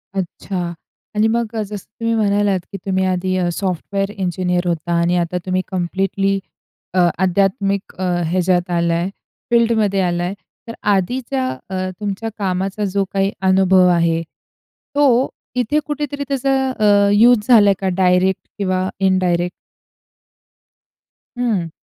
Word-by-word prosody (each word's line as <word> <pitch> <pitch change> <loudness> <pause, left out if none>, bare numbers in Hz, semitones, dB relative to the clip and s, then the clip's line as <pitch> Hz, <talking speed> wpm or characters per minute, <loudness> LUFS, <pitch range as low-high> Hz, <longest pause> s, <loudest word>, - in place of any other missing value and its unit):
अच्छा. 180 -1 -3 0.4
आणि 215 +1 +3
मग 230 0 -1
अ, 220 - 0
जसं 205 -1 -7
तुम्ही 230 0 0
म्हणालात 205 -2 +2
की 200 - -5
तुम्ही 190 -1 +1
आधी 185 0 0
अ, 180 -1 +1
सॉफ्टवेअर 195 +2 -2
इंजिनिअर 180 -2 -1
होता 170 0 -1
आणि 175 +1 +2
आता 175 +1 -1
तुम्ही 185 0 0
कंप्लीटली 195 +2 0 0.5
अ, 180 -1 +4 0.2
आध्यात्मिक 195 +1 0
अ, 185 - -5 0.3
ह्याच्यात 180 0 +1
आला 170 -1 +1
आहे 170 +3 0 0.4
फील्डमध्ये 220 -4 +3
आला 175 -1 0
आहे. 180 +2 -2 0.3
तर 230 - -6 0.2
आधीच्या 190 - -1 0.2
अ, 185 -1 -2
तुमच्या 210 +2 -3
कामाचा 195 +1 -1
जो 200 0 +2
काही 195 0 +1 0.2
अनुभव 185 -1 +5
आहे. 170 -2 +2 0.7
तो 265 -3 +4 0.3
इथे 250 +4 +1
कुठेतरी 290 -1 -3
त्याचा 275 0 0 0.3
अ, 205 -1 +4
यूज 220 0 +5
झाला 220 -5 +7
आहे 195 - +3
का 195 - -2 0.2
डायरेक्ट 180 +1 +2
किंवा 185 -2 0
इनडायरेक्ट? 180 -2 +1 1.9
हं. 215 -9 0
190 Hz, 135 wpm, -19 LUFS, 180-210 Hz, 1.9 s, झाला